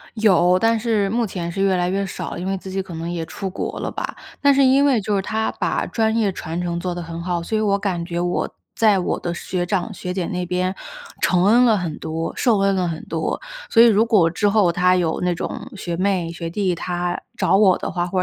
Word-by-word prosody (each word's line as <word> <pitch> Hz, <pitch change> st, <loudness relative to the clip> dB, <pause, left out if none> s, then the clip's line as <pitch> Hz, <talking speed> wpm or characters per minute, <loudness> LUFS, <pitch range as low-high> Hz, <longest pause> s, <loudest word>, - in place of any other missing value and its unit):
有， 185 Hz, -5 st, +4 dB
但 225 Hz, +2 st, +2 dB
是 215 Hz, -3 st, +1 dB
目 235 Hz, +2 st, +1 dB
前 175 Hz, -4 st, -4 dB
是 195 Hz, -, -4 dB
越 195 Hz, -1 st, +3 dB
来 180 Hz, 0 st, 0 dB
越 195 Hz, +2 st, 0 dB
少， 190 Hz, -, -6 dB
因 180 Hz, -, -4 dB
为 195 Hz, 0 st, -1 dB
自 190 Hz, 0 st, -8 dB
己 195 Hz, +1 st, -2 dB
可 185 Hz, -2 st, -10 dB
能 165 Hz, +1 st, -4 dB
也 170 Hz, -2 st, -3 dB
出 195 Hz, -, -5 dB
国 -, -, -4 dB
了 -, -, -3 dB
吧。 -, -, -5 dB, 0.2 s
但 280 Hz, -1 st, +5 dB
是 275 Hz, 0 st, +4 dB
因 265 Hz, +2 st, +5 dB
为 270 Hz, -5 st, +3 dB
就 205 Hz, +1 st, -1 dB
是 195 Hz, -, 0 dB
她 220 Hz, +2 st, -1 dB
把 -, -, -1 dB
专 220 Hz, -1 st, 0 dB
业 210 Hz, -4 st, +1 dB
传 170 Hz, -1 st, -5 dB
承 170 Hz, -1 st, -2 dB
做 180 Hz, 0 st, -3 dB
得 175 Hz, -, -5 dB
很 165 Hz, 0 st, -6 dB
好， 175 Hz, -1 st, -2 dB
所 220 Hz, +6 st, -2 dB
以 -, -, +1 dB
我 200 Hz, -2 st, +2 dB
感 185 Hz, -4 st, -2 dB
觉 170 Hz, 0 st, -4 dB
我 175 Hz, 0 st, -1 dB, 0.3 s
在 215 Hz, -3 st, +4 dB
我 180 Hz, -, -1 dB
的 175 Hz, -, -3 dB
学 175 Hz, +1 st, -3 dB
长 195 Hz, +2 st, -1 dB
学 180 Hz, -2 st, -5 dB
姐 180 Hz, -3 st, -2 dB
那 180 Hz, -1 st, -3 dB
边 180 Hz, +1 st, -1 dB, 0.5 s
承 180 Hz, -1 st, +3 dB
恩 235 Hz, +4 st, +6 dB
了 225 Hz, -3 st, +4 dB
很 170 Hz, -6 st, -3 dB
多、 160 Hz, +1 st, -3 dB
受 230 Hz, -4 st, +3 dB
恩 195 Hz, 0 st, +2 dB
了 180 Hz, -2 st, 0 dB
很 160 Hz, -1 st, -5 dB
多。 160 Hz, -1 st, -3 dB, 0.3 s
所 230 Hz, -, +6 dB
以 -, -, +8 dB
如 220 Hz, -1 st, +4 dB
果 200 Hz, -8 st, +4 dB
之 205 Hz, +5 st, +1 dB
后 200 Hz, -4 st, +3 dB
她 180 Hz, +1 st, +3 dB
有 170 Hz, -3 st, 0 dB
那 180 Hz, -1 st, +1 dB
种 170 Hz, -, -5 dB
学 175 Hz, -3 st, -4 dB
妹、 185 Hz, -2 st, 0 dB
学 165 Hz, 0 st, -5 dB
弟 185 Hz, 0 st, 0 dB
她 175 Hz, +1 st, -3 dB, 0.2 s
找 -, -, +3 dB
我 195 Hz, -3 st, +5 dB
的 -, -, -4 dB
话， 175 Hz, 0 st, -1 dB
或 185 Hz, +1 st, -2 dB
185 Hz, 270 characters per minute, -21 LUFS, 175-210 Hz, 0.5 s, 以